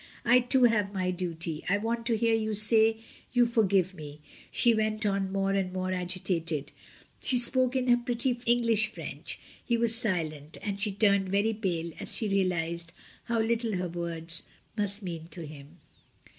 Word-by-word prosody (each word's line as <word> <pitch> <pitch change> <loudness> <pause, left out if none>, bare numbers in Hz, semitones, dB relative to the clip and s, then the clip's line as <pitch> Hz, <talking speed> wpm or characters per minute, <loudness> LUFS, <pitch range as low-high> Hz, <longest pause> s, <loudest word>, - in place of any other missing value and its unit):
I 245 +2 +5
too 250 +1 +3
have 215 -4 +2
my 185 -1 -1
duty. 170 -3 -4
I 200 - +2
want 230 +2 -3
to 230 -2 +1
hear 230 +1 +1
you 220 -1 -1
say 220 +1 +4 0.4
you 245 -1 +4
for 230 -1 +1
give 190 -2 +1
me," 150 -3 -11 0.3
she 235 - +4
went 215 0 -1
on 195 -1 -1
more 195 0 -1
and 195 -2 -1
more 185 0 -3
agitated. 175 -4 -2 0.5
She 255 - +2
spoke 255 +1 +7
in 255 -1 -1
her 245 -1 +5
pretty 240 +1 -1
English 230 -3 +4
French. - - -6 0.3
He 235 - 0
was 230 -1 +5
silent, 165 -10 -1
and 200 -1 -4
she 205 0 +1
turned 200 -1 +1
very 200 +3 +1
pale 175 -6 -3
as - - 0
she 220 - -1
realised 170 -4 -1 0.3
how 235 -1 0
little 225 -1 -1
her 180 -1 -3
words 170 -1 -3 0.3
must 205 -1 0
mean 165 -3 -7
to 170 0 -7
him. 150 +2 -13
200 Hz, 175 wpm, -28 LUFS, 175-230 Hz, 0.5 s, spoke